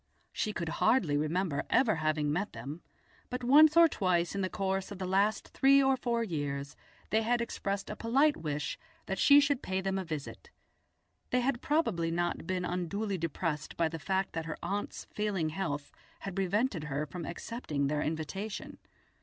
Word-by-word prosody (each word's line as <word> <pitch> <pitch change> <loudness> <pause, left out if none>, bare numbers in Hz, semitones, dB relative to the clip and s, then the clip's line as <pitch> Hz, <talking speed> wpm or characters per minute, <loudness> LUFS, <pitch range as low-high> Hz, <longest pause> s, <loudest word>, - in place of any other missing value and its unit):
She 215 - -1
could 170 -5 -3
hardly 180 - +3
remember 155 +1 0
ever 220 -9 +3
having 155 -1 0
met 200 +6 -2
them, 150 +5 -7 0.5
but 250 0 -4
once 305 +5 +7
or 335 0 +9
twice 180 - 0
in 200 - -2
the 185 - 0
course 195 -1 -2
of 200 - -6
the 190 - -4
last 200 +3 +1
three 275 +1 +5
or 265 0 +4
four 235 -2 -1
years 145 -6 -3 0.4
they 220 - +3
had 240 +2 +1
expressed 200 -4 -3
a 210 - -5
polite 275 +8 +3
wish 150 -1 -3 0.3
that 190 - -3
she 285 0 +8
should 285 -2 +2
pay 190 0 -2
them 190 0 -1
a - - -2
visit; 160 - -6 0.8
they 250 - +2
had 245 -1 0
probably 230 - +1
not 175 0 -1
been 185 -1 -1
unduly 185 +3 -2
depressed 165 -1 -3
by 165 - +3
the 165 0 -6
fact 190 +4 -1
that 165 -1 -3
her 160 - -5
aunt's 205 +1 -3
failing 200 -7 0
health 150 -4 -3 0.3
had 195 -2 -5
prevented 195 - 0
her 145 +1 -2
from 170 +3 -7
accepting 155 - -3
their 150 +1 0
invitation. 165 +8 -4
190 Hz, 180 wpm, -31 LUFS, 160-225 Hz, 0.8 s, or